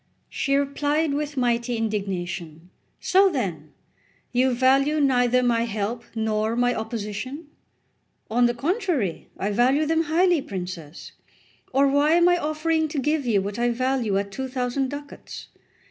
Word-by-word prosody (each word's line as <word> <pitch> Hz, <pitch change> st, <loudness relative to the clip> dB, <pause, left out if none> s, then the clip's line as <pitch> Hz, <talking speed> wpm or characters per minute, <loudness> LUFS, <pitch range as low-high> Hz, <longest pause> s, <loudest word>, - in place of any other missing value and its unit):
She 275 Hz, -1 st, 0 dB
replied 290 Hz, +2 st, 0 dB
with 290 Hz, 0 st, -3 dB
mighty 240 Hz, -1 st, 0 dB
indignation: 180 Hz, -6 st, -4 dB, 0.3 s
"So 385 Hz, +1 st, +4 dB
then 175 Hz, -, -3 dB, 0.6 s
you 255 Hz, +1 st, +2 dB
value 270 Hz, +4 st, +3 dB
neither 250 Hz, -3 st, +3 dB
my 235 Hz, -1 st, +2 dB
help 220 Hz, +1 st, -3 dB
nor 220 Hz, 0 st, 0 dB
my 245 Hz, 0 st, +2 dB
opposition?" 225 Hz, +7 st, -5 dB, 0.8 s
"On 240 Hz, +2 st, +3 dB
the 240 Hz, -, -1 dB
contrary, 300 Hz, -, -1 dB
I 200 Hz, -, -1 dB
value 260 Hz, +8 st, +3 dB
them 325 Hz, +1 st, +1 dB
highly, 340 Hz, +1 st, +3 dB
princess; 180 Hz, -, -7 dB, 0.6 s
or 275 Hz, +2 st, +4 dB
why 285 Hz, +3 st, +3 dB
am 345 Hz, +1 st, +5 dB
I 355 Hz, 0 st, +4 dB
offering 315 Hz, +1 st, 0 dB
to 305 Hz, 0 st, -6 dB
give 295 Hz, 0 st, 0 dB
you 205 Hz, -4 st, +2 dB
what 200 Hz, +3 st, -5 dB
I 240 Hz, 0 st, +2 dB
value 245 Hz, -4 st, 0 dB
at 200 Hz, 0 st, -2 dB
two 265 Hz, +6 st, -4 dB
thousand 255 Hz, +1 st, -1 dB
ducats? 285 Hz, +1 st, -9 dB
250 Hz, 145 wpm, -24 LUFS, 215-290 Hz, 0.8 s, am